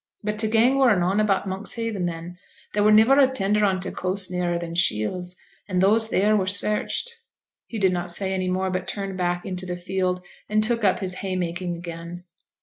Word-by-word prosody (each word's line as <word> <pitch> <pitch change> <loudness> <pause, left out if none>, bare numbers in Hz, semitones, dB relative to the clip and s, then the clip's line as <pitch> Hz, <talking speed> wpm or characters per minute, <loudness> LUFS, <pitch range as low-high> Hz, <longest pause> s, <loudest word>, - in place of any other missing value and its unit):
But 210 0 -2
t' 220 0 +2
gang 235 +5 +3
were 250 -6 +5
noane 185 +3 +1
about 200 -2 +1
Monkshaven 200 0 -2
then: 170 +1 -7 0.3
there 205 - +1
were 210 +1 +5
niver 225 +6 +6
a 270 - +7
tender 210 -5 0
on 190 -2 +2
t' 180 - -5
coast 185 0 -2
nearer 175 -1 -1
than 170 -1 -5
Shields, 175 +3 0 0.3
an' 185 -3 -2
those 215 +4 +4
theere 210 0 +2
were 190 -3 +1
searched.' 210 - +1 0.5
He 230 - -6
did 190 -3 +2
not 175 0 -3
say 190 +2 0
any 185 -1 -1
more, 185 +1 -1
but 185 0 -3
turned 195 -2 -4
back 175 -1 -1
into 185 -1 -5
the 180 0 -4
field, 180 0 -2 0.3
and 215 0 +2
took 230 0 0
up 190 -2 +2
his 185 -1 -1
hay 190 -1 -2
making 175 0 -3
again. 170 +1 -8
190 Hz, 205 wpm, -24 LUFS, 180-210 Hz, 0.5 s, a